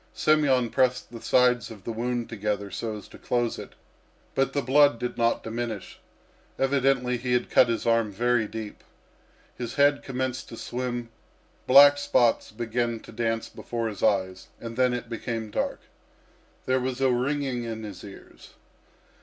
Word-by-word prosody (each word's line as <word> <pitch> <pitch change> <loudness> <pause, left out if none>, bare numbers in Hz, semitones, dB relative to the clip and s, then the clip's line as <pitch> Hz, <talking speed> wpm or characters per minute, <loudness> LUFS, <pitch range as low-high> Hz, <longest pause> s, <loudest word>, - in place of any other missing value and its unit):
Semyon 135 -6 +3
pressed 125 -2 +1
the 115 -1 -9
sides 125 -2 +3
of 105 -4 -11
the 115 - -4
wound 120 +1 -2
together 105 -2 -3
so 110 +3 -4
as 105 - -11
to - - -14
close 120 -1 -1
it, - - -9 0.6
but 135 0 +1
the 140 - 0
blood 145 0 +5
did 125 +1 -4
not 115 0 +1
diminish. 115 -2 -5 0.6
Evidently 135 -2 +2
he 125 +1 -2
had 125 - 0
cut 125 - +6
his 115 - -1
arm 115 -2 +2
very 120 +2 +1
deep. 110 -1 -7 0.7
His 120 -2 -5
head 145 0 +4
commenced 130 -1 -4
to 115 - -9
swim, 120 -1 -4 0.6
black 145 +2 +8
spots 120 -4 +2
began 115 +1 -2
to - - -13
dance 115 0 -1
before 115 -1 -4
his 100 -3 -8
eyes, 95 -3 0
and 115 -1 -7
then 125 0 +3
it 120 -1 -5
became 115 -1 -4
dark. - - -2 0.8
There 130 0 +2
was 130 0 -3
a 135 -1 +3
ringing 130 0 -1
in 110 -1 -5
his 100 -4 -8
ears. 100 -1 -13
120 Hz, 160 wpm, -26 LUFS, 115-130 Hz, 0.8 s, black